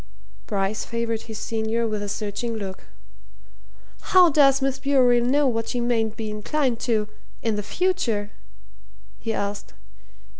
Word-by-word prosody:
Bryce 200 +1 -1
favoured 230 -1 -2
his 220 - -5
senior 225 +1 -1
with 215 -1 -2
a 205 - -4
searching 210 +3 -3
look. 195 -3 -6 1.3
"How 360 -3 +7
does 275 -2 +5
Miss 270 -1 -1
Bewery 255 -4 +4
know 265 +1 +2
that 225 0 -2
she 245 - -1
mayn't 225 -2 0
be 220 -1 -4
inclined 240 +3 -1
to 215 -2 +2 0.4
in 225 -2 +1
the 210 - -1
future?" 230 - -1 0.9
he 225 - -3
asked. 200 -1 -4
230 Hz, 140 wpm, -24 LUFS, 210-260 Hz, 1.3 s, How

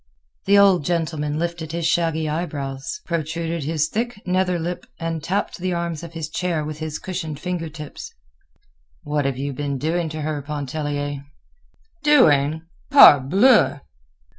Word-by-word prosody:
The 200 +1 +5
old 195 -5 +5
gentleman 155 -3 -1
lifted 170 -1 -3
his 170 -1 -2
shaggy 160 -1 +1
eyebrows, 150 - -4
protruded 165 -1 -3
his 155 0 0
thick 235 +5 -3
nether 180 -1 +1
lip, 175 +2 -4
and 165 -2 -4
tapped 190 +3 -2
the 185 0 -1
arms 170 -2 -3
of 170 -1 -9
his 160 -2 -4
chair 160 -1 -2
with 155 0 -6
his 155 -1 -4
cushioned 160 -6 -5
fingertips. 165 -4 -6 0.9
"What 150 -1 -1
have 135 -2 -1
you 140 +1 -3
been 140 +1 -3
doing 160 +4 -1
to 155 0 -5
her, 150 -1 -2
Pontellier?" 145 0 -4 0.8
"Doing! 160 - +4 0.3
_Parbleu! 190 - +6
160 Hz, 140 wpm, -22 LUFS, 150-175 Hz, 0.9 s, Parbleu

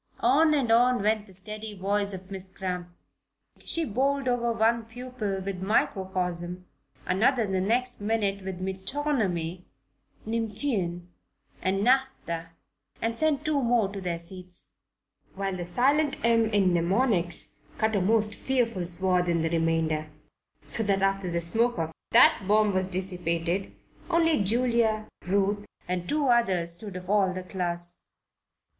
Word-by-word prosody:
On 305 +5 +5
and 255 -6 +1
on 245 -1 +4
went 215 0 +1
the 190 - -15
steady 210 +3 -3
voice 200 +1 0
of 190 0 -9
Miss 190 -1 -7
Cramp. 180 -2 -4 0.7
She 330 -1 -1
bowled 275 +3 0
over 240 -1 +1
one 230 0 +2
pupil 225 -4 -4
with 195 -2 -4
"microcosm," 185 -3 -1 0.4
another 225 +6 +2
the 190 -2 -1
next 245 +4 0
minute 205 -2 0
with 190 -1 -5
"metonymy 190 - -2 0.3
"; - - -35
"nymphean" 215 -6 -2 0.6
and 195 +1 0
"naphtha" 250 -10 +1 0.7
sent 305 +3 0
two 300 -2 +1
more 235 -4 +2
to 200 0 -7
their 175 -2 -2
seats; 180 +1 -9 0.7
while 195 -1 -2
the 175 -1 -4
silent 275 - +2
"m" 230 -1 +4
in 195 -4 +3
"mnemonics" 175 0 +1 0.3
cut 220 0 +1
a 200 - +2
most 215 +2 +2
fearful 230 -8 -1
swath 180 0 +1
in 170 -2 +1
the 165 - -1
remainder, 165 -2 0 0.6
so 145 +10 0
that 195 -2 +1
after 195 -1 +1
the 170 0 -1
smoke 230 +8 +2
of 160 -1 -2 0.2
that 195 - +6
bomb 210 0 +3
was 185 0 0
dissipated 180 -1 -1 0.4
only 330 - +3
Julia, 230 0 +1 0.2
Ruth, 200 +2 +1 0.2
and 180 -1 -3
two 295 -2 +1
others 190 -8 +2
stood 195 +2 -9
of 180 0 -7
all 195 -2 +2
the 185 - -4
class. 175 -2 -1
195 Hz, 140 wpm, -27 LUFS, 180-230 Hz, 0.7 s, that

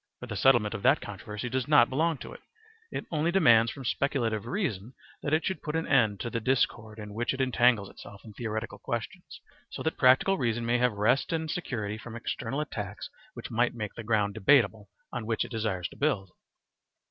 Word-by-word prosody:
For - - -7
the 110 -4 -6
settlement 115 -1 +4
of 110 - -5
that 135 +7 +4
controversy 105 +3 -6
does 130 0 -2
not 145 -6 +6
belong 160 +4 0
to - - -8
it; - - -11 0.5
it - - -5
only 160 +1 +1
demands 115 -11 +5
from 135 -2 -9
speculative 115 -5 -1
reason 125 - -3 0.3
that 145 - -3
it 155 +1 +2
should 190 -6 -2
put 150 - -4
an 160 - 0
end 115 -7 +3
to 120 - -4
the 115 - -1
discord 115 -3 0
in 105 -1 -8
which 120 +4 -1
it - - -10
entangles 125 -5 +3
itself 100 +1 -12
in 110 - -11
theoretical 110 0 -4
questions, - - -5 0.3
so - - -6
that 160 - -2
practical 130 +9 +5
reason 120 -2 0
may 120 +1 +2
have 125 -2 +2
rest 110 +10 +1
and 160 -1 -1
security 110 -11 -3
from 115 0 -9
external 125 +4 -3
attacks 105 -9 -6 0.2
which - - -8
might 120 +1 +1
make 105 -3 -5
the 115 - -8
ground 105 -2 +1
debatable 110 -2 +3 0.2
on 110 - -4
which 115 -1 0
it - - -11
desires 110 -6 -2
to - - -14
build. 110 -11 0
120 Hz, 205 wpm, -28 LUFS, 105-135 Hz, 0.5 s, not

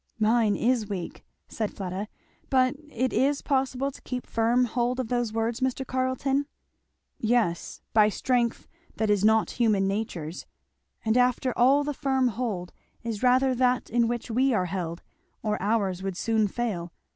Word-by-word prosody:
"Mine 220 -1 +3
is 235 -2 +1
weak," 185 -4 -5 0.2
said 215 -2 -3
Fleda. 190 +1 -4 0.4
"But 255 -1 +3 0.2
it 255 -1 -1
is 280 +2 +2
possible 270 0 0
to - - -14
keep 250 -1 -5
firm 235 +2 +2
hold 245 +2 -1
of 250 -3 -2
those 240 -3 0
words, 225 +1 -1
Mr. 260 0 -1
Carleton?" 260 +2 0 0.7
"Yes 220 -7 0
by 215 -1 +6
strength 240 +1 0 0.3
that 220 -1 +1
is 205 -1 +2
not 220 +1 +4
human 205 -4 +3
nature's 190 -5 -4 0.6
And 220 +2 +2
after 250 0 +2
all 270 +4 +4
the 295 0 -2
firm 265 -2 +1
hold 215 -7 -3 0.3
is 225 -3 -4
rather 255 +1 +4
that 250 0 +1
in 235 0 +3
which 240 0 -3
we 255 +2 +2
are 185 -3 +1
held, 170 -2 -4 0.4
or 210 -3 -1
ours 195 -3 0
would 190 -2 -4
soon 220 -1 +1
fail. 195 -6 -3
235 Hz, 155 wpm, -27 LUFS, 210-255 Hz, 0.7 s, by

